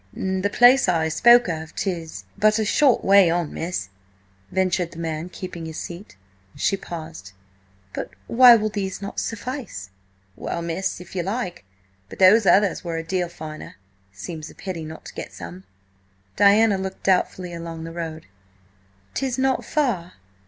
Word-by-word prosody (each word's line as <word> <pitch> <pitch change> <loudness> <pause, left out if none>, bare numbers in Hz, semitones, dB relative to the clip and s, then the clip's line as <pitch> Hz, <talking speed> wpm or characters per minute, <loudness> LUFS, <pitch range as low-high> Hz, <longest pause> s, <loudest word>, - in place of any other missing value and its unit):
"The 190 +1 -1
place 245 -1 +6
I 160 -2 +1
spoke 240 +8 +6
of 160 -2 -5
is 170 -4 -4
but 215 +1 +3
a 220 - 0
short 265 +4 +3
way 195 -2 +6
on, 170 -2 -1
miss," 165 - -4 0.6
ventured 180 -2 0
the - - -12
man, 165 0 -4
keeping 175 -3 -7
his 160 - -7
seat. 175 - -8 0.4
She 195 - +1
paused. 160 - -9 0.6
"But - - -4 0.2
why 245 0 +8
will 215 -1 0
these 195 -2 -4
not 200 +1 -5
suffice?" 230 - -5 0.4
"Well, 170 - -4
miss, 170 +3 -2
if 180 +1 -12
you 180 - 0
like. 190 - -4 0.4
But - - -10
those 195 +3 +6
others 200 -2 +4
were 170 -2 -3
a 165 - -3
deal 180 +1 -2
finer. 155 -2 -9 0.4
It 100 - -27
seems 155 - -7
a - - -15
pity 175 -4 -6
not 160 +1 -10
to - - -9
get - - -7
some." 90 +3 -9 0.7
Diana 205 0 +5
looked 190 0 -6
doubtfully 185 -1 +1
along 165 -1 -6
the 165 - -7
road. 160 -2 -6 0.9
"'Tis 265 -2 -2
not 265 0 +1
far?" 205 - -1
180 Hz, 160 wpm, -23 LUFS, 165-205 Hz, 0.9 s, why